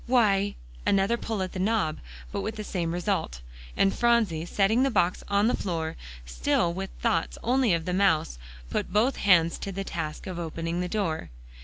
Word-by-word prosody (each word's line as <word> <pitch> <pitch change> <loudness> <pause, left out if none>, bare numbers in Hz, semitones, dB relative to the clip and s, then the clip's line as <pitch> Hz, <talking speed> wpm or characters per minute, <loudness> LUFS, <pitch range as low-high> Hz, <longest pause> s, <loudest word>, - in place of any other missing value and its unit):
"Why" 205 -5 +3 0.3
another 195 +4 +3
pull 220 -4 -3
at 185 - -4
the 185 - -5
knob; 195 -5 +1 0.3
but - - -2
with 220 - -3
the 215 - -5
same 175 -5 -2
result, 175 - -2 0.4
and 195 - +3
Phronsie, 220 -9 +2
setting 210 +6 +2
the 270 - +3
box 185 -6 +1
on 200 +1 +2
the 245 - +2
floor, 165 -4 -3 0.3
still - - +1
with 190 +2 -4
thoughts 230 -2 0
only 250 -1 +3
of 165 -1 -3
the 180 - -1
mouse, 160 - +2 0.3
put - - -2
both 225 +7 +2
hands 170 -4 +4
to 200 - -4
the 195 +1 -4
task 160 -5 -5
of 185 -2 -5
opening 165 +1 -3
the 180 - -2
door. 180 -7 -2
195 Hz, 185 wpm, -27 LUFS, 165-215 Hz, 0.4 s, hands